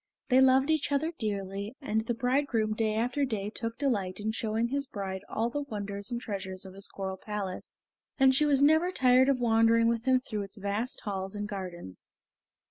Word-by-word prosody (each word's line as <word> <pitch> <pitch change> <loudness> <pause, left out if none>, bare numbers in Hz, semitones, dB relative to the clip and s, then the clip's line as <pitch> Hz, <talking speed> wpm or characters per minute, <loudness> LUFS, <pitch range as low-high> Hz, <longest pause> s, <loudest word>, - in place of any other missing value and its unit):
They 255 0 +6
loved 265 +3 +5
each 310 -2 0
other 310 +4 0
dearly, 200 +1 -3
and 220 -7 0
the 240 - 0
bridegroom 245 -3 +1
day 215 -1 0
after 245 +5 0
day 210 -5 -2
took 230 0 -4
delight 205 -10 -1
in 215 +1 -1
showing 225 +1 -1
his 280 +1 -1
bride 190 -4 -5
all 230 +2 -1
the 290 - -2
wonders 205 -6 -5
and 240 - -2
treasures 190 -5 -5
of 190 - -10
his 195 +1 -5
coral 190 -1 -5
palace, 200 -2 -5 0.4
and 265 -1 +5
she 300 +3 +3
was 280 -1 +4
never 315 +5 +4
tired 255 -3 +4
of 270 -2 +2
wandering 230 -1 +4
with 230 0 -1
him 260 -1 +4
through 215 -4 -4
its 200 +2 -6
vast 205 +5 -2
halls 195 -1 -4
and 205 0 -3
gardens. 180 - -7
225 Hz, 195 wpm, -29 LUFS, 200-260 Hz, 0.4 s, They